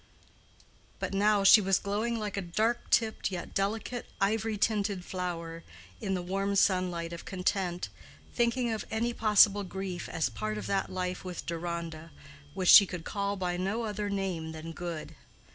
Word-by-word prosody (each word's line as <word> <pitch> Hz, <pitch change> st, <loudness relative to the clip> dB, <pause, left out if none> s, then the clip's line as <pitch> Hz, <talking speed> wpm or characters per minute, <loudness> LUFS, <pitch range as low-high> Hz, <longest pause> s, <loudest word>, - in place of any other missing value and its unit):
But -, -, -4 dB
now 205 Hz, +1 st, +3 dB
she 205 Hz, +2 st, +9 dB
was 195 Hz, -1 st, +3 dB
glowing 215 Hz, +4 st, -1 dB
like 210 Hz, -2 st, -4 dB
a 200 Hz, -, -1 dB
dark 215 Hz, +7 st, -1 dB
tipped 220 Hz, -3 st, +2 dB
yet 180 Hz, -2 st, -5 dB
delicate 220 Hz, +5 st, -2 dB
ivory 215 Hz, +2 st, +1 dB
tinted 200 Hz, -3 st, 0 dB
flower 170 Hz, -3 st, -4 dB, 0.4 s
in 195 Hz, -1 st, -1 dB
the 180 Hz, -, -3 dB
warm 195 Hz, +2 st, -1 dB
sunlight 180 Hz, -3 st, +1 dB
of 170 Hz, -, -7 dB
content, 180 Hz, -, -2 dB, 0.4 s
thinking 240 Hz, 0 st, +1 dB
of 220 Hz, -, -2 dB
any 230 Hz, +2 st, -1 dB
possible 210 Hz, -2 st, +5 dB
grief 190 Hz, -2 st, -5 dB
as 160 Hz, -4 st, 0 dB
part 110 Hz, -2 st, -4 dB
of 105 Hz, -, -5 dB
that 195 Hz, -, 0 dB
life 185 Hz, -1 st, -3 dB
with 180 Hz, -2 st, -6 dB
Deronda, 170 Hz, -1 st, -4 dB, 0.5 s
which 185 Hz, -2 st, +1 dB
she 200 Hz, -, +10 dB
could 180 Hz, -3 st, -6 dB
call 200 Hz, -1 st, -2 dB
by 180 Hz, -2 st, -2 dB
no 195 Hz, +6 st, -1 dB
other 210 Hz, -1 st, -3 dB
name 185 Hz, -5 st, -3 dB
than 160 Hz, +1 st, -7 dB
good. 170 Hz, -2 st, -6 dB
195 Hz, 160 wpm, -30 LUFS, 175-210 Hz, 0.5 s, she